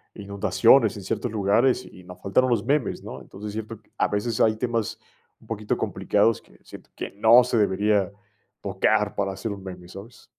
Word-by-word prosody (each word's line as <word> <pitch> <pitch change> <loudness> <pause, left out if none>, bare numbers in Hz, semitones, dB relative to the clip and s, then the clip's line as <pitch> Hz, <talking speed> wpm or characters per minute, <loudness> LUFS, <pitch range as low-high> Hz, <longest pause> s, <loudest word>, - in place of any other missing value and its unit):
inundaciones 105 +3 +3
en 100 - -8
ciertos 115 +4 -3
lugares 110 +5 +2
y 90 - -14
nos 90 0 -12
faltaron 130 +7 +2
los 115 -3 0
memes, 145 -1 0
¿no? - - -8
Entonces, 105 +1 -9
siento 110 +1 -6
q - - -33
a - - +2
veces 105 +2 -2
hay 110 -1 +4
temas 115 -2 -2 0.4
un - - -21
poquito 110 -2 -2
complicados 115 -1 +1
que - - -23
siento - - -13
que - - -6
no 110 +5 +6
se 125 -2 0
debería 100 -1 +2 0.5
tocar 105 -1 +1
para 100 -1 -1
hacer 100 +3 -5
un 100 - -10
meme, 90 -2 -9
¿sabes? 100 +6 -12
105 Hz, 185 wpm, -24 LUFS, 100-115 Hz, 0.5 s, no